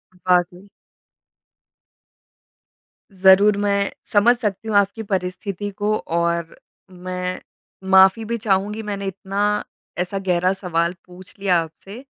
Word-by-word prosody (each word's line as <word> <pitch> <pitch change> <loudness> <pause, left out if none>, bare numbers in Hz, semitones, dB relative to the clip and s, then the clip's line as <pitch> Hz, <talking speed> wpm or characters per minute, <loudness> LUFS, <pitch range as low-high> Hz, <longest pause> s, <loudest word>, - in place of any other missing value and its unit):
वाक़ई। 180 +1 0 2.4
ज़रूर 195 +2 +5
मैं 200 -1 0 0.2
समझ 225 +4 +5
सकती 215 -2 -3
हूँ 215 - -1
आपकी 200 +3 +1
परिस्थिति 195 +1 -3
को 210 +2 -1
और 170 0 -2 0.4
मैं 180 0 -5 0.5
माफ़ी 190 +4 +5
भी 235 +2 -2
चाहूँगी 210 0 -1
मैंने 200 -1 -4
इतना 200 +2 -1 0.4
ऐसा 180 +2 -2
गहरा 185 0 +1
सवाल 170 -2 -1
पूछ 180 +1 -14
लिया 185 -3 +2
आपसे। 195 +9 -10
195 Hz, 110 wpm, -21 LUFS, 180-205 Hz, 2.4 s, ज़रूर